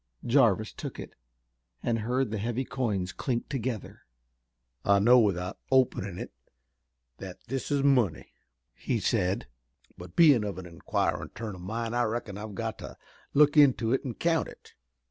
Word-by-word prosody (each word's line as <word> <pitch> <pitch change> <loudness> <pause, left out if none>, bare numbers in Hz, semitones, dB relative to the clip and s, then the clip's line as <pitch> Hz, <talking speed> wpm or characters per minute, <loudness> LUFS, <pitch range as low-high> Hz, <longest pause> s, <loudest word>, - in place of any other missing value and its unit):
Jarvis - - +3
took - - -7
it, - - -8 0.7
and 115 -1 0
heard 125 +2 -1
the 110 - -2
heavy 120 +5 -2
coins 105 -9 -2
clink 120 +1 -2
together. 125 -6 -4 0.8
"I 100 0 +4
know 120 +5 +6
without 95 -3 0
openin' 110 -8 +2
it - - -6 0.9
that 95 -2 -8
this 135 +1 -3
is 140 -2 +1
money," 125 - +2 0.4
he 120 - -2
said, 95 -3 0 0.5
"but 90 0 -11
bein' 145 -9 +6
of 100 -3 -4
an 95 - -7
inquirin' 85 -3 -2
turn 110 -4 -5
o' - - -11
mind 115 +5 -4
I 120 - +2
reckon 110 -2 -3
I've 105 0 -7
got 110 +1 -4
to - - -9 0.4
look 145 +1 +5
into 130 -5 +5
it 135 - +1
an' 125 -4 -5
count 165 -2 +1
it." - - -15
115 Hz, 160 wpm, -28 LUFS, 100-130 Hz, 0.9 s, know